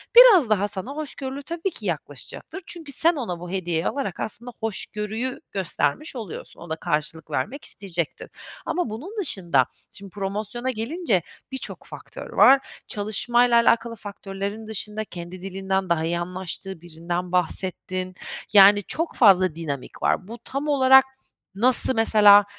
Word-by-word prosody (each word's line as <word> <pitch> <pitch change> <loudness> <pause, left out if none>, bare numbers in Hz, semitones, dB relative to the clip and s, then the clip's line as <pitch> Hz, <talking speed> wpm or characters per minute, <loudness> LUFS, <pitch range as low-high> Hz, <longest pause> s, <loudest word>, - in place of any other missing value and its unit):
Biraz 440 - +9
daha 205 -1 +2
sana 205 +5 -3
hoşgörülü 280 -2 -5
tabii 335 +5 -3
ki - - -8
yaklaşacaktır. 380 - -5
Çünkü 325 -5 -4
sen 335 +5 +4
ona 220 - -4
bu 175 0 -8
hediyeyi 175 -3 -1
alarak 270 -10 -3
aslında 240 +3 -2
hoşgörüyü 220 +3 -2
göstermiş 190 - -1
oluyorsun. 220 -8 -7
O 170 - -10
da 160 - -1
karşılık 155 0 -3
vermek 260 - -3
isteyecektir 175 -5 -3 0.4
ama 355 -7 -1
bunun 285 - -7
dışında 170 - +1 0.3
şimdi 200 -1 -9
promosyona 205 +5 -3
gelince 230 - -1 0.3
birçok 265 - -5
faktör - - -10
var. 270 0 +5 0.2
Çalışmayla 235 +4 +2
alakalı 230 0 +2
faktörlerin 200 +1 -6
dışında 215 0 -2
kendi 175 -1 -9
dilinden 190 0 -2
daha 165 -2 +1
iyi 170 +1 -1
anlaştığı 185 0 -5
birinden 175 +1 -4
bahsettin, 185 +1 -1 0.4
yani, 205 0 +8
çok 330 - -3
fazla 185 - +5
dinamik 145 -5 -6
var. 185 - +1
Bu 230 +2 -8
tam 275 +4 -4
olarak 265 -2 +6 0.5
nasıl 255 +4 +3
mesela, 210 -2 +7
205 Hz, 140 wpm, -24 LUFS, 180-255 Hz, 0.5 s, Biraz